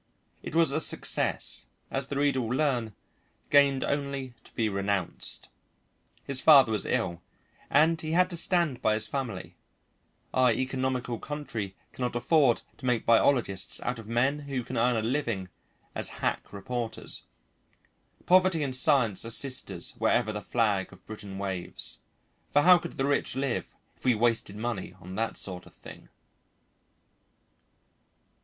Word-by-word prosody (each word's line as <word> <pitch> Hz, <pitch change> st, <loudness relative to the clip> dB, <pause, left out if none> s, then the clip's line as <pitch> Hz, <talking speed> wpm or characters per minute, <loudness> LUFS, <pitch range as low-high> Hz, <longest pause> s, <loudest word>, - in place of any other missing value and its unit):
It -, -, -7 dB
was 165 Hz, -4 st, +4 dB
a 155 Hz, +3 st, 0 dB
success, -, -, +1 dB, 0.2 s
as 135 Hz, -1 st, -1 dB
the 140 Hz, -, -5 dB
reader 140 Hz, -2 st, +2 dB
will 120 Hz, +2 st, -2 dB
learn, 125 Hz, -8 st, 0 dB, 0.6 s
gained 140 Hz, -2 st, +5 dB
only 140 Hz, -3 st, -2 dB
to -, -, -17 dB
be 110 Hz, -, +1 dB
renounced. 100 Hz, -3 st, 0 dB, 0.8 s
His 135 Hz, -2 st, -2 dB
father 140 Hz, -7 st, +7 dB
was 105 Hz, -2 st, 0 dB
ill 95 Hz, -8 st, -1 dB, 0.5 s
and 160 Hz, +3 st, +3 dB
he 155 Hz, 0 st, -3 dB
had 180 Hz, +1 st, +4 dB
to -, -, -3 dB
stand 170 Hz, -6 st, +1 dB
by 110 Hz, -, +2 dB
his 110 Hz, 0 st, +1 dB
family; 110 Hz, -6 st, -5 dB, 0.8 s
our 130 Hz, -1 st, +4 dB
economical 130 Hz, -1 st, -2 dB
country 115 Hz, -10 st, -5 dB, 0.2 s
cannot 125 Hz, -1 st, -3 dB
afford 125 Hz, 0 st, +3 dB, 0.2 s
to 130 Hz, -, -9 dB
make 125 Hz, -2 st, +1 dB
biologists 115 Hz, -5 st, +2 dB
out 125 Hz, -1 st, -2 dB
of 110 Hz, -, -10 dB
men 125 Hz, +6 st, +1 dB
who 140 Hz, -3 st, -4 dB
can -, -, -7 dB
earn 120 Hz, +1 st, +2 dB
a 110 Hz, -, 0 dB
living 115 Hz, -7 st, -2 dB, 0.4 s
as -, -, -2 dB
hack -, -, -3 dB
reporters. 120 Hz, +3 st, -5 dB, 1.0 s
Poverty 185 Hz, -3 st, +4 dB
and 130 Hz, -2 st, -2 dB
science 125 Hz, -7 st, +3 dB
are 115 Hz, -, -5 dB
sisters 130 Hz, +2 st, 0 dB
wherever 115 Hz, -3 st, +2 dB
the 105 Hz, -, -4 dB
flag 105 Hz, -4 st, 0 dB
of -, -, -17 dB
Britain 105 Hz, -3 st, -8 dB
waves; 95 Hz, -3 st, -3 dB, 0.5 s
for 145 Hz, -, +3 dB
how 180 Hz, 0 st, +8 dB
could 170 Hz, 0 st, -7 dB
the 135 Hz, -, +1 dB
rich 140 Hz, -2 st, 0 dB
live 135 Hz, -2 st, -2 dB, 0.2 s
if -, -, -21 dB
we 125 Hz, -2 st, +3 dB
wasted 115 Hz, -2 st, +1 dB
money 110 Hz, -2 st, -4 dB
on 90 Hz, +1 st, -10 dB
that 115 Hz, +3 st, -2 dB
sort 90 Hz, -2 st, -3 dB
of -, -, -18 dB
thing? -, -, -13 dB
125 Hz, 150 wpm, -28 LUFS, 110-140 Hz, 1.0 s, how